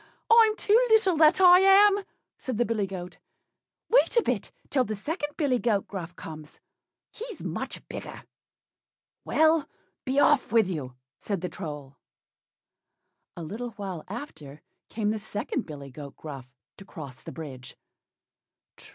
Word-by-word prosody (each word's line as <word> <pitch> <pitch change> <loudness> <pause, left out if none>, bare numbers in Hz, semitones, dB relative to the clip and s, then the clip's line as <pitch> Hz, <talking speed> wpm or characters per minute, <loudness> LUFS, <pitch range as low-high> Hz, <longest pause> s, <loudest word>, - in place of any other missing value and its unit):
I'm 450 -2 +7
too 420 - 0 0.2
little, 435 -5 +4
that 310 +3 +5
I 360 -1 +8
am," 395 +1 +6 0.3
said 255 -4 -5
the 240 - +2
billy 215 -4 -1
goat; 180 -1 -7 0.7
"wait - - +3
a 470 - +5
bit - - -2 0.2
till 260 - +3
the 215 -2 -4
second 295 - -4
billy 275 -6 +1
goat 215 -5 0
Gruff 180 -3 -7
comes, 155 -2 -10 0.5
he's 465 +1 -8
much - - -5
bigger." - - -8 1.0
"Well! 315 -1 +3 0.3
be 265 +1 0
off 285 -5 +3
with 225 -4 +4
you," 140 -9 -5 0.2
said 200 -5 -3
the 180 - -3
Troll. 145 -6 -8 1.4
A 170 - -5
little 230 +8 -6
while 195 -6 -6
after 155 - -9 0.3
came 215 -1 -1
the 220 - -2
second 215 +4 -4
billy 140 -3 -9
goat 140 +1 -10
Gruff 135 -5 -8 0.3
to - - -11
cross 145 -9 -10
the - - -9
bridge. 130 -5 -9
215 Hz, 145 wpm, -27 LUFS, -, 1.4 s, I